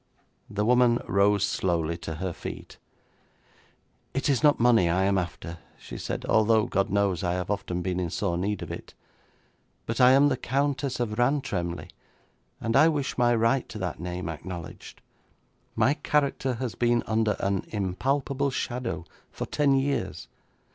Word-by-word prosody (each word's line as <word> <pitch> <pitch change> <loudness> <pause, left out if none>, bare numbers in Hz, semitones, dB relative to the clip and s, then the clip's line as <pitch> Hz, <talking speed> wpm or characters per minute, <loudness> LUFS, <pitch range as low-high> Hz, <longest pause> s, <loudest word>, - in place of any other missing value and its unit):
The 105 0 -1
woman 125 0 +4
rose 100 +1 +3
slowly 85 -5 0
to 80 -1 -5
her 90 +2 -3
feet. - - -8 1.4
'It 135 - 0
is 135 - +2
not 150 -1 +4
money 115 -7 +4
I 90 +3 +2
am 100 0 +2
after,' 85 -1 -6 0.2
she - - -10
said, - - -4
'although, 110 0 +3
God 95 -4 0
knows, 100 -3 +1
I 90 -1 0
have 90 +2 -2
often 90 -3 -2
been 90 0 -1
in 90 -2 -1
sore 85 +1 -1
need 100 +3 -2
of - - -7
it. - - -8 0.9
But 115 +3 -1
I 125 +1 +8
am 140 +2 +6
the 130 - 0
Countess 140 +1 -1
of 110 -2 -2
Rantremly, 120 -10 -1 0.7
and 115 0 -1
I 155 +4 +7
wish 145 -4 -2
my 120 -1 +3
right 115 +3 +1
to - - -7
that 90 -6 -4
name 90 0 -4
acknowledged. 85 +1 -8 0.7
My 135 - +3
character 140 -4 0
has 120 -1 -3
been 120 -1 +1
under 110 -1 +1
an 100 -1 -1
impalpable 135 +8 -1
shadow 120 -8 -3 0.2
for - - -5
ten 145 -2 +2
years. 140 +1 -1
110 Hz, 160 wpm, -27 LUFS, 90-130 Hz, 1.4 s, I